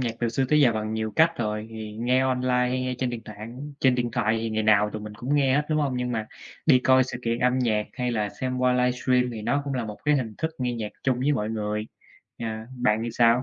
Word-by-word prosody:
nhạc 115 -2 -1
từ 120 - +1
xưa 130 +4 0
tới 150 0 +4
giờ 125 -5 +5
bằng 110 0 -3
nhiều 110 0 -2
cách 165 +1 +4
rồi. 105 -1 -2
Thì 110 -1 -7
nghe 125 +4 +1
online 130 -1 0 0.2
hay 130 +1 -1
nghe 130 0 -2
trên 130 -1 0
điện 115 -2 -5
tạng 105 -1 -10
á 115 +4 -8 0.2
trên 130 -2 +4
điện 120 -1 -1
thoại 115 -2 +1
thì 115 - -2
ngày 110 0 0
nào 105 -1 +4
tụi 105 - -6
mình 105 0 -8
cũng 125 +6 -2
nghe 135 -2 +3
hết, 150 - +3
đúng 155 - +2
hông? 135 -3 0
Nhưng 125 0 -2
mà 110 -1 -2 0.4
đi 130 - +7
coi 130 0 +4
sự 125 - -6
kiện 115 0 0
âm 125 +1 +2
nhạc, 110 -4 +1
hay 125 -1 -2
là 105 -3 0
xem 130 +2 -4
qua 125 0 +3
livestream 125 0 +2
thì 110 -2 -6
nó 140 +6 +1
cũng 140 -1 -3
là 120 -3 -1
một 105 -1 -7
cái 150 0 +4
hình 115 -5 -3
thức 160 - -1
nghe 125 -1 -1
nhạc 110 -2 -4
chung 130 -2 +1
với 145 +3 +2
mọi 110 -6 -1
người. 105 -1 -2 0.5
Ờ, 115 - -4 0.3
bạn 110 -3 +2
thì 120 - -3
sao? 120 +1 +4
120 Hz, 275 wpm, -25 LUFS, 110-130 Hz, 0.5 s, đi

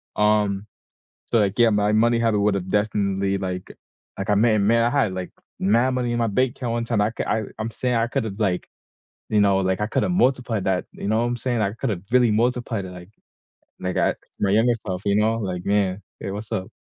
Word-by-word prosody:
Um, 105 -1 +2 0.6
so, 115 - +2
like, 100 +1 +1
yeah, 120 -1 +6
my 105 0 +2
money 115 +2 +3
habit 115 -3 +2
would 100 0 +2
have 95 -1 -3
definitely, 100 -2 0
like 90 -1 -4 0.5
like, 95 +1 -2
I 105 - +4
may 110 +1 +4
may 105 +3 +3
have, 115 -2 +2
like, 95 -1 -5 0.3
mad 115 +7 +3
money 120 -2 -1
in 120 - -1
my 115 -1 +1
bank 125 +4 +1
account 120 -3 -3
one 115 0 -1
time, 115 -3 0
I 105 - +1
ca - - -3
I 110 - +1 0.2
I'm 110 +1 -2
saying 125 +1 -1
I 115 0 +2
could 115 - -1
have, 105 0 -6
like, 95 -4 0 0.6
you 105 - +2
know, 100 -1 +4
like, 95 0 0
I 105 - 0
could - - 0
have - - 0
multiplied 125 - +1
that, 95 -1 +1
you - - -6
know 110 +2 +2
what - - +1
I'm 120 0 -2
saying? 120 -1 -1
I 100 -2 +1
could 130 +2 -3
have 90 -2 -4
really 125 -3 +4
multiplied 120 -2 0
it, 90 - -8
like, 90 +1 -11 0.7
they 95 0 -2
got - - +1 0.2
my 100 - +1
younger 115 +4 +4
self, 90 -1 -3
you 100 - +2
know, 110 +2 +2
like, 90 -4 -4
"Man, 100 -1 +1 0.2
hey. 95 - -4
What's 105 +2 -7
up?" 95 0 -3
105 Hz, 235 wpm, -23 LUFS, 100-115 Hz, 0.7 s, yeah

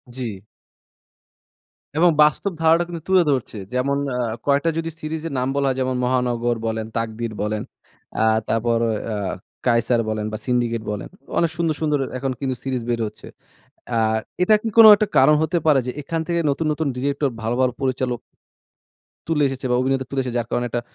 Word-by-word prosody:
জি। 110 -7 -5 1.5
এবং 175 +2 +6
বাস্তব 150 +6 +1
ধারাটা 165 +1 +4
কিন্তু 170 -2 -6
তুলে 190 -2 +5
ধরছে। 130 -5 -2 0.2
যেমন 140 +2 +1 0.2
আ - - -2 0.3
কয়েকটা 145 +3 +2
যদি 165 0 -2
সিরিজের 155 0 -4
নাম 125 - 0
বলা 140 -1 +1
হয় 130 - -1
যেমন 130 0 0
মহানগর 120 -1 +1
বলেন, 110 0 -2
তাকদির 115 0 -3
বলেন, 105 0 -1 0.6
আ - - +4 0.3
তারপর 115 +1 +1 0.4
অ - - -2 0.5
কায়সার 115 0 +3
বলেন 110 -1 -2
বা - - -2
সিন্ডিকেট 120 -2 0
বলেন। 105 - -5 0.3
অনেক 170 -2 +2
সুন্দর, 165 -2 0
সুন্দর 150 -2 +1 0.2
এখন 135 +1 -2
কিন্তু 130 -2 -2
সিরিজ 130 -2 -2
বের 120 -1 0
হচ্ছে। - - -12 0.6
অ্যা 115 -2 0 0.4
এটা 215 +4 +5
কি 225 - -1
কোনো 225 - +11
একটা 210 +1 0
কারণ 145 +3 +6
হতে 160 +2 0
পারে? 150 -3 +5
যে 125 - -1
এখান 165 +3 -3
থেকে 170 0 0
নতুন, 145 +3 -1
নতুন 150 0 -1
ডিরেক্টর 140 +2 0
ভালো, 115 +2 -1
ভালো 130 -1 +3
পরিচালক 130 -2 -1 1.1
তুলে 155 -3 +1
এসেছে 135 0 -5
বা - - +3
অভিনেতা 130 0 0
তুলে 135 - -2
এসেছে 125 -2 -3
যার 115 - -4
কারণে 120 - 0
একটা 120 - -2
130 Hz, 180 wpm, -22 LUFS, 120-155 Hz, 1.5 s, কোনো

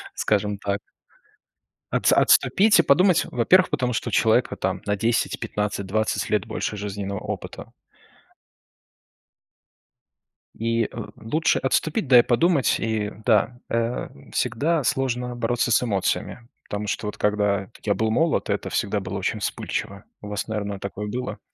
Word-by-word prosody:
скажем 105 -1 0
так. 100 0 -2 1.1
Отс - - +3
отступить 210 +1 +5
и 170 - +6
подумать, 180 +5 +4
во-первых, 180 +11 +4
потому 130 -5 0
что 115 - -2
у - - -13
человека - - +3
там - - -2
на 105 0 +1
10-15-20 105 -2 -1
лет - - +1
больше 105 - -3
жизненного 100 -1 -4
опыта. - - -7 2.9
И, 115 0 +1
э, - - -5 0.3
лучше 155 +9 +1
отступить, 155 - 0
да 125 -2 +8
и - - +8
подумать. 140 +2 +2
И 110 -2 -1
да, 120 +2 +2
э, 115 +1 -1 0.2
всегда 155 +5 0
сложно 125 -1 -1
бороться 120 0 0
с 115 - +4
эмоциями, 115 +2 -2 0.2
потому 105 +1 -3
что 105 - -2
вот 105 - -4
когда 105 0 0
я 100 -1 +2
был 110 0 0
молод, 165 +8 +1
это - - -1
всегда - - -1
было - - -5
очень - - -2
вспыльчиво. 100 +1 -4 0.2
У 105 - -9
вас, 105 +1 -4
наверно, 105 -2 -3
такое 100 +1 -5
было. 125 +3 -4
115 Hz, 140 wpm, -24 LUFS, 105-125 Hz, 2.9 s, да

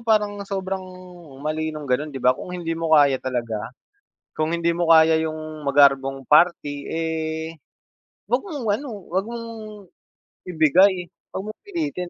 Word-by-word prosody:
parang 210 -3 +1
sobrang 190 -1 -3 0.6
mali 155 +1 -1
no'ng 155 -1 -6
gano'n, 140 +3 0
'di 135 -3 -7
ba, 125 - +6
kung 155 - -9
hindi 165 -2 -3
mo 165 -1 +2
kaya 140 -3 +4
talaga, 115 -4 -3 0.7
kung 155 +2 0
hindi 170 0 +1
mo 170 0 0
kaya 160 -1 +6
'yong 155 -1 -5
magarbong 135 -1 +3
party, 150 -3 +3
eh, 160 0 -3 0.7
huwag 245 - +4
mong 285 - -6
ano, 285 - -8 0.2
huwag 190 +3 0
mong, 235 0 -6 1.0
ibigay, 180 +3 +4 0.2
huwag 190 - -5
mong - - -61
pilitin. 310 - -4
160 Hz, 145 wpm, -23 LUFS, 150-190 Hz, 1.0 s, ba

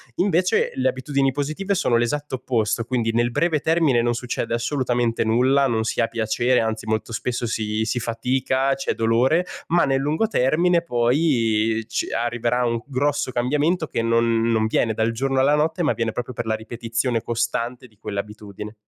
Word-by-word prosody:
invece 180 -1 +2
le 130 0 +2
abitudini 135 +1 0
positive 155 +9 -2
sono 150 -10 +1
l'esatto 130 +5 -1
opposto, 115 -3 -1
quindi 120 -1 -1
nel 120 +1 +1
breve 160 +4 +1
termine 160 -6 +2
non 120 0 +1
succede 120 -1 -3
assolutamente 120 -2 0
nulla, 130 +5 +3
non 115 -3 0
si 110 - -1
ha 115 - +2
piacere, 115 +2 +1
anzi 110 -1 -2
molto 110 +1 -2
spesso 120 +1 -2
si 110 -1 -1
si 115 +2 -1
fatica, 130 +3 0
c'è 135 - -2
dolore, 120 +10 +2 0.2
ma 175 +1 +3
nel 135 -1 +1
lungo 155 +10 0
termine 170 - +2
poi 120 -6 +1
ci - - -2
arriverà 120 +1 0
un 115 -1 -1
grosso 145 0 0
cambiamento 150 +7 0
che 115 - -2
non 115 0 +2
non 115 -1 +1
viene 110 0 +1
dal 110 +1 0
giorno 135 +3 -1
alla 140 +3 +4
notte, 160 +4 0
ma 155 - +2
viene 115 -1 -2
proprio 125 +2 -5
per 120 0 -4
la 110 0 0
ripetizione 115 +1 -2
costante 120 +2 -2
di 110 -3 -29
quell'abitudine. 105 +1 -7
120 Hz, 170 wpm, -22 LUFS, 115-140 Hz, 0.2 s, alla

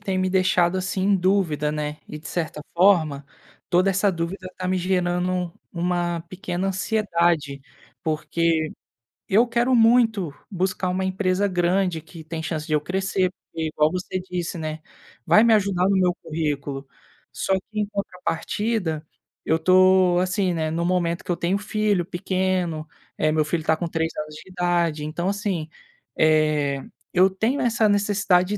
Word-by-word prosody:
tem 195 -2 -2
me 185 0 +1
deixado 185 -1 +3
assim 185 0 -2
em 200 +1 +3
dúvida, 175 -6 +1
né, 150 0 -3
e 150 - -7
de 155 - -12
certa 160 -3 -3
forma, 165 -6 +3 0.4
toda 185 +2 +3
essa 195 +2 +2
dúvida 180 +2 -4
tá 185 - -4
me 185 0 +1
gerando 180 -1 0 0.2
uma 175 -1 -1
pequena 185 0 -3
ansiedade. 170 -8 0 0.4
Porque 160 0 0 0.6
eu 220 +5 +4
quero 235 +2 +1
muito 225 - +4 0.2
buscar 185 0 -1
uma 185 +1 -1
empresa 190 +1 +1
grande 180 -2 +1
que 160 +1 -12
tem 160 0 -5
chance 155 -2 -3
de 155 - -1
eu 150 - +3
crescer, 190 +1 0
porque 165 -3 -6
igual 155 -1 +2
você 185 +2 -3
disse, 180 -2 -4
né, 155 -1 -4 0.4
vai 215 - +6
me 230 - +5
ajudar 195 -3 +2
no 200 - +3
meu 180 -2 +3
currículo. 145 -3 -3 0.5
Só 195 - -1
que 210 +3 -3
em 210 - +1
contrapartida, 195 -2 -2 0.4
eu 160 - +2
tô, 185 +1 +5
assim, 185 0 +1
né, 160 -2 -1
no 165 +2 -1
momento 170 -1 0
que - - -3
eu 170 - 0
tenho 180 +3 0
filho 210 -2 0
pequeno, 180 -2 -1 0.3
é 155 0 +2
meu 155 -1 +2
filho 160 +1 -1
tá 160 0 +2
com 175 - -2
3 165 0 -1
anos 155 0 -5
de 170 - -12
idade. 175 -4 0
Então, 170 +4 -2
assim, 195 -6 -2 0.5
eh, 155 -3 +2 0.3
eu 185 +1 +5
tenho 225 +9 0
essa 235 -3 +2
necessidade 200 -1 +2
180 Hz, 160 wpm, -23 LUFS, 160-190 Hz, 0.6 s, vai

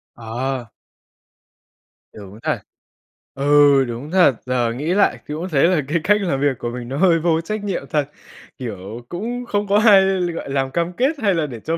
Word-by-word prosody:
Ờ. 120 +1 -4 1.4
Đúng 100 0 -12
thật. - - -1 0.8
Ừ, 140 -1 +4
đúng 120 +6 -7
thật, 180 -9 +4
giờ 120 -2 0
nghĩ 150 +8 -2
lại 205 - +2
thì 150 - -5
cũng 175 +4 -5
thấy 140 -4 +2
là 175 -4 +2
cái 155 - 0
cách 210 +2 +3
làm 140 -8 -1
việc 140 -3 +1
của 120 - -3
mình 120 -1 -7
nó 135 - -4
hơi 170 -2 +4
vô 165 0 +1
trách 215 +4 -4
nhiệm 195 -8 -3
thật. 150 0 0 0.5
Kiểu, 115 -1 -7
cũng 240 +7 -4
không 205 -2 -1
có 200 +1 +3
ai 200 -3 +7 0.3
gọi 150 - -6
làm 135 -1 -1
cam 170 +3 -1
kết 275 - 0
hay 200 -3 +2
là 160 -2 0
để 120 -5 -7
cho 165 +6 -3
145 Hz, 195 wpm, -20 LUFS, 125-185 Hz, 1.4 s, ai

